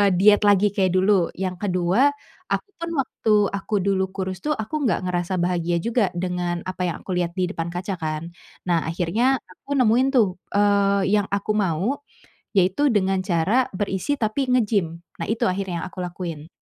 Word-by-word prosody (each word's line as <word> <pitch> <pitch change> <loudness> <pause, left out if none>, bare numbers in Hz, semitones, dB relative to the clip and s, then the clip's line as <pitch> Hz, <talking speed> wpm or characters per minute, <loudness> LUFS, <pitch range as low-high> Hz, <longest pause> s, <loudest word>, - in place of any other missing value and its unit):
diet 205 +3 +6
lagi 205 0 +4
kayak 190 -2 +1
dulu. 185 -1 +3
Yang 185 0 -3
kedua, 180 +4 +1 0.5
aku, - - -2
kan, 335 0 -4
waktu 240 -4 0 0.2
aku 200 +2 -3
dulu 195 -1 +1
kurus, 185 -2 -3
tuh, 300 +9 -1
aku 220 +8 -3
enggak 185 -3 0
ngerasa 180 0 -1
bahagia 175 -1 0
juga 230 -3 +2
dengan 175 -1 -2
apa 185 -1 -3
yang 170 - -5
aku - - -6
lihat 175 -1 -2
di 185 -1 0
depan 165 -4 -3
kaca, 180 +2 -4
kan. 155 +1 -4 0.3
Nah, 170 -3 0
akhirnya 185 +10 +1 0.2
aku 285 - -6
nemuin 250 0 +4
tuh, 230 -5 +5 0.3
eee, 200 -1 +3
yang 200 - -2
aku 200 +1 -1
mau, 200 - 0 0.5
yaitu 195 +9 +3
dengan 190 -3 +1
cara 195 +8 +1
berisi, 200 +8 -2
tapi 250 +4 0
nge-gym. 215 -7 +2 0.3
Nah, - - -3
itu 225 - +1
akhirnya 185 -2 -2
aku 185 0 -6
lakuin. 170 -3 -6
190 Hz, 170 wpm, -23 LUFS, 175-210 Hz, 0.5 s, diet